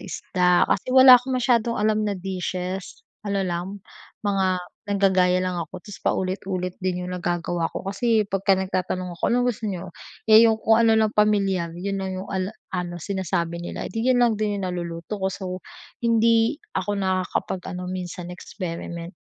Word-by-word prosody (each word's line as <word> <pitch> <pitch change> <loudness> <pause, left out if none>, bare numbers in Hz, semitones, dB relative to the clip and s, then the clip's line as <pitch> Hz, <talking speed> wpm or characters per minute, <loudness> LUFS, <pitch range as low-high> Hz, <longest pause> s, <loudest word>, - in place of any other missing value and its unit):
isda, 180 -1 +1
kasi - - 0
wala 260 -1 +10
akong 260 0 -2
masyadong 235 -2 +2
alam 215 0 +2
na 205 - 0
dishes. 185 0 -4 0.2
Ano 200 -2 -1
lang, 185 +3 -4 0.4
mga 190 -2 +1 0.3
naggagaya 190 -2 +3
lang 180 -1 -2
ako, 175 +3 -8
tapos 205 - -10
paulit-ulit 185 -1 -2
din 180 -1 -2
'yung 180 - -5
nagagawa 175 -1 -1
ko - - -7
kasi 220 +2 +1
pagka 195 0 +1
nagtatanong 185 -1 -2
ako, 170 - -1
"Anong 245 +1 +2
gusto 215 -1 -5
niyo?" 180 -3 -5 0.3
Eh, 220 0 +8
'yung 220 - +2
kung 220 +1 +3
ano 225 -1 +5
lang 220 -1 +2
pamilyar, 195 -5 +1
'yon 195 +2 -3
lang 190 -1 -3
ala 190 -1 -2
'yung 220 - -12 0.2
ano, 175 -1 -3
sinasabi 170 -2 -2
nila, 175 - -5
eh, - - -7
di, 225 +3 -1
'yon 255 - +4
lang 235 - +3
din 210 -1 0
'yung 195 - -3
naluluto 170 +3 -5
ko. 190 - +1
So, 185 -1 -5 0.4
hindi 230 +2 +3 0.2
ako 200 +2 -1
nakakapag 185 -1 -1 0.2
ano 180 - -5
minsan, 180 -1 -6
experiment. 170 -1 -6
190 Hz, 170 wpm, -24 LUFS, 180-210 Hz, 0.4 s, wala